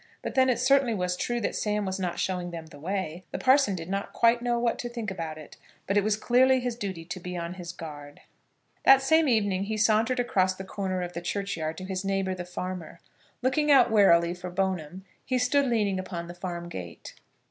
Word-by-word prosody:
But - - -4
then 260 0 +4
it 250 - +2
certainly 255 -2 +3
was 180 -2 -1
true 240 +6 -2
that - - -1
Sam 210 -1 -1
was 190 0 -3
not 175 -2 -2
showing 180 -2 -2
them 165 -2 -7
the 155 -3 -14
way. 180 0 -3
The - - -4
parson 260 -6 +4
did 165 -2 -6
not 195 +1 -3
quite 235 +1 +3
know 240 0 0
what 235 -1 0
to 240 - -4
think 230 -4 -4
about 165 -4 -5
it, 155 - -12 0.3
but 195 - -1
it 205 - +4
was 215 0 +1
clearly 260 +3 +4
his 245 -2 -3
duty 190 -7 -5
to 180 - -6
be 180 0 -6
on 170 0 -4
his 180 -2 -7
guard. 145 -4 -10 0.6
That 270 0 +7
same 315 +3 +4
evening 205 -5 +1
he 215 +1 -3
sauntered 225 +3 +2
across 190 -6 +1
the 190 - -7
corner 190 -1 -3
of 175 0 -6
the 170 - -5
churchyard 170 -4 -3
to 185 - -7
his 190 0 -3
neighbour 195 -1 0
the 180 -1 -6
farmer. 180 -2 -6 0.4
Looking 295 +4 +1
out 260 -5 +6
warily 170 -5 +5
for 180 0 -7
Bone'm, 185 -1 -2 0.2
he 255 - 0
stood 270 +3 +2
leaning 210 -5 +1
upon 175 -2 -5
the 175 - -8
farm 175 -1 -5
gate. 90 - -8
190 Hz, 220 wpm, -27 LUFS, 175-235 Hz, 0.6 s, That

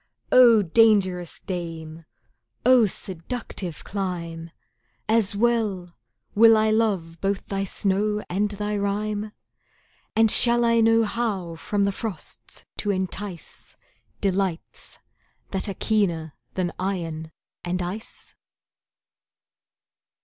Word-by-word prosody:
O! 235 -4 +7
dangerous 185 -3 +3
dame 165 -3 -6 0.6
oh 250 -3 +6
seductive 185 -1 -5
clime! 170 -4 -4 0.6
As 220 -3 +2
well, 210 -6 0 0.4
will 225 +1 +7
I 215 0 +3
love 195 -7 0
both 195 0 -1
thy 195 0 -2
snow 210 +2 0
and 205 +4 0
thy 210 0 -3
rime, 210 +1 -2 0.8
And 225 -1 +5
shall 240 0 +5
I 230 0 +4
know 225 0 +5
how 205 -7 -2
from 200 +4 0
the 200 - +1
frosts 200 -3 -6
to 205 - -2
entice 190 -1 -5 0.4
Delights 190 -3 -2 0.5
that 195 +2 -2
are 195 - -4
keener 170 -8 0 0.2
than 180 -2 -1
iron 165 -4 -3 0.3
and 180 +1 -2
ice? 185 +5 -5
200 Hz, 105 wpm, -24 LUFS, 175-215 Hz, 0.8 s, O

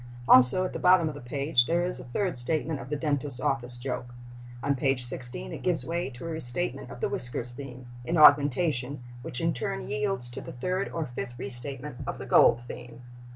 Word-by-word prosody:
Also, 130 +9 +7
at - - -5
the - - -4
bottom 180 -2 +5
of - - -6
the 145 - -10
page, 135 0 +1
there 175 +1 +1
is 180 - -4
a - - -8
third 180 +10 -2
statement 150 +4 +1
of 125 0 -9
the 150 - -1
dentist's 145 -3 -2
office 125 -2 -2
joke. 120 -1 -5 0.5
On 140 - +2
page 135 -1 0
16 120 - -4
it - - -7
gives 180 -3 -1
way 170 -2 -2
to 125 +4 -10
a - - -4
restatement 135 -3 +3
of 125 - -10
the - - +1
whiskers 120 0 -4
theme, 130 -1 -10 0.2
in 165 +7 -1
augmentation, 145 -2 +4 0.2
which 125 - -2
in 165 0 +1
turn 125 -1 -4
yields 140 -2 -2
to - - -7
the - - -9
third 185 +10 -2
or 165 -2 -3
fifth 125 -1 -7
restatement 130 +2 -5
of - - -4
the - - -8
gold 115 - +5
theme. 120 0 -10
135 Hz, 205 wpm, -27 LUFS, 125-160 Hz, 0.5 s, Also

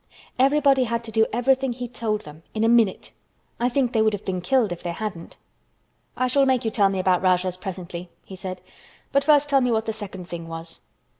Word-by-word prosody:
Everybody 275 -1 +4
had 235 0 -2
to 225 - -7
do 220 0 +3
everything 260 +2 +1
he 245 0 -5
told 220 -3 -2
them—in 160 +8 -6
a - - +4
minute. 230 -5 +2 0.5
I 245 - +2
think 250 -1 0
they 220 - +3
would 220 -1 +3
have 205 - -5
been 185 -1 -2
killed 230 +1 +2
if 175 - -5
they 175 - -3
hadn't." 185 -4 -6 0.8
"I 255 - +1
shall 270 +2 +3
make 255 -3 +2
you 220 - 0
tell 200 -2 +3
me 195 - -2
about 185 -1 +2
Rajahs 185 -1 +1
presently," 180 -2 -7 0.2
he 190 - -9
said, 185 0 -6 0.5
"but 280 0 +3
first 295 0 +4
tell 275 -2 +3
me 250 - +1
what 220 -1 +1
the 220 - -2
second 195 -4 -8
thing 170 -1 -7
was." 165 0 -7
220 Hz, 215 wpm, -24 LUFS, 185-250 Hz, 0.8 s, Everybody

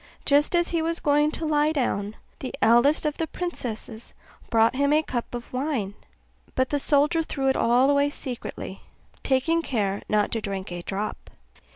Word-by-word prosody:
Just 295 +4 +3
as 345 0 +2
he 335 -1 0
was 330 +1 0
going 295 +1 +3
to 320 +1 -4
lie 300 0 +2
down, 220 -8 -1 0.2
the 260 - -5
eldest 240 +8 +4
of 300 -1 -1
the 325 - -1
princesses 240 -11 -5 0.3
brought 225 +2 +3
him 280 +2 +2
a 305 +1 +4
cup 245 -4 -4
of 240 +1 -8
wine; 255 -7 -1 0.6
but 260 0 +1
the 290 - 0
soldier 295 +4 +3
threw 275 -4 -1
it 265 - +2
all 245 +3 +4
away 285 0 +3
secretly, 255 -4 -6 0.4
taking 300 +6 +1
care 205 -9 -1
not 210 -1 +2
to 225 - -1
drink 195 -3 -4
a 175 0 -4
drop. 200 +4 -4
270 Hz, 175 wpm, -25 LUFS, 225-300 Hz, 0.6 s, eldest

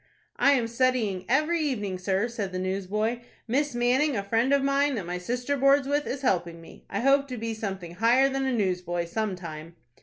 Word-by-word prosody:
"I 280 - +5
am 245 -4 +1
studying 230 -6 0
every 310 +6 +2
evening, 210 - -2
sir," 195 +4 0
said 215 -5 -4
the 185 - -4
newsboy. 200 +5 -1 0.3
"Miss 275 +3 0
Manning, 250 +3 +2
a 200 - -2
friend 230 +6 +1
of 280 -1 +3
mine, 275 0 +2
that 200 -6 -4
my 180 +1 -4
sister 245 +8 -2
boards 275 0 +4
with, 290 +1 0
is 275 +1 -4
helping 170 -7 0
me. 165 - -15
I 200 - -2
hope 275 +2 +3
to 255 -2 -6
be 225 0 -3
something 195 -6 -5
higher 235 +8 +4
than 270 0 -1
a - - +1
newsboy 180 -6 -1
some 210 +3 -2
time." 165 -2 -9
230 Hz, 205 wpm, -27 LUFS, 190-270 Hz, 0.3 s, I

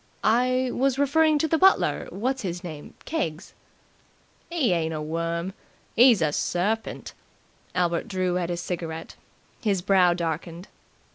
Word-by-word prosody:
"I 255 +2 +2
was 265 +1 +1
referring 305 +2 +3
to 320 - +1
the 320 +1 +1
butler 385 +1 +3
what's 255 +6 -2
his 175 -3 -4
name 155 -4 -9
Keggs." 195 - -3 1.0
"'E 290 - +2
ain't 160 -2 -1
a - - -3
worm. 170 +3 -3 0.4
'E's 235 -7 +6
a 150 - +1
serpint." 205 +9 -2 0.6
Albert 175 -2 0
drew 185 -2 -1
at 175 -1 -2
his 175 -1 -2
cigarette. 165 -2 -5 0.5
His 195 -5 0
brow 185 -3 +4
darkened. 170 +1 -4
185 Hz, 135 wpm, -25 LUFS, 170-255 Hz, 1.0 s, E's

